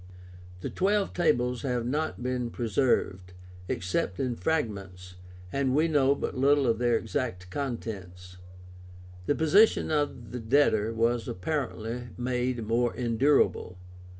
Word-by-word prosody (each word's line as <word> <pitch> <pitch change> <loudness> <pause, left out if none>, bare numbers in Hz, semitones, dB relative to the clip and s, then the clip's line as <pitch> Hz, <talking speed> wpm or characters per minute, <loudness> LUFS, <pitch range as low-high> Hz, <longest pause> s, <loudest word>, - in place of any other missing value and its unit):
The - - -4
TWELVE 200 +1 +1
TABLES 125 -8 +1
have 125 -3 -1
not 145 0 -2
been 125 -1 -2
preserved, 105 -6 0 0.3
except 90 +1 -2
in 125 -2 -1
fragments, 100 - -3 0.4
and 135 -1 +1
we 155 +3 +3
know 140 -3 +3
but - - -4
little 140 +2 +3
of 115 -2 +1
their 120 -1 +2
exact 90 -10 -4
contents. 90 -8 -6 0.9
The 145 - +2
position 175 +6 +4
of 145 -6 -1
the 125 - -4
debtor 115 -3 +2
was 115 +1 0
apparently 120 - -3
made 125 -1 -1
more 120 +2 +1
endurable. 120 -5 +1
125 Hz, 125 wpm, -28 LUFS, 110-140 Hz, 0.9 s, position